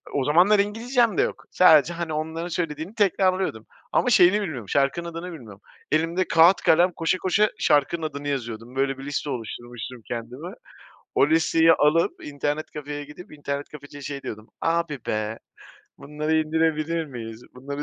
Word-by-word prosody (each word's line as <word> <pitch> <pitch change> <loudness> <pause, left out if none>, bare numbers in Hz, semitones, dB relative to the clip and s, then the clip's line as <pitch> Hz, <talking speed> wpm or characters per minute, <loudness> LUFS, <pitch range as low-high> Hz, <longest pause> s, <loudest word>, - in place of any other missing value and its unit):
O 135 -2 +1
zamanlar 180 +8 +5
İngilizcem 225 +1 +1
de - - +5
yok, - - -3
sadece 170 -2 +5
hani 170 -2 -4
onların 160 +3 -3
söylediğini 165 +2 -4
tekrarlıyordum. 185 - +1 0.3
Ama 250 - +2
şeyini 205 -1 +5
bilmiyorum 130 - -5
şarkının 140 - 0
adını 170 +2 -6
bilmiyorum. 110 -10 -11 0.3
Elimde 165 +4 +1
kağıt, 165 +3 +6
kalem 175 +3 +4
koşa 165 +3 0
koşa 205 +3 +2
şarkının 150 +3 +2
adını 145 -1 -6
yazıyordum. 120 -2 -5
Böyle 135 0 0
bir 135 - -8
liste 145 0 -3
oluşturmuştum 120 0 -7
kendime. 125 +8 -6 0.7
O 140 - +4
listeyi 165 0 +4
alıp, 160 +2 +2
internet 145 +1 -3
kafeye 145 0 -6
gidip, 150 +5 -13
internet 145 -1 -5
kafeciye 145 -1 -11
şey 140 0 -6
diyordum: 110 0 -8
"Abi 165 -3 0
be, 110 +1 -2 0.6
bunları 150 +2 -2
indirebilir 160 +1 0
miyiz? 115 -3 -8
Bunları" 140 +3 -6
155 Hz, 150 wpm, -24 LUFS, 140-170 Hz, 0.7 s, kağıt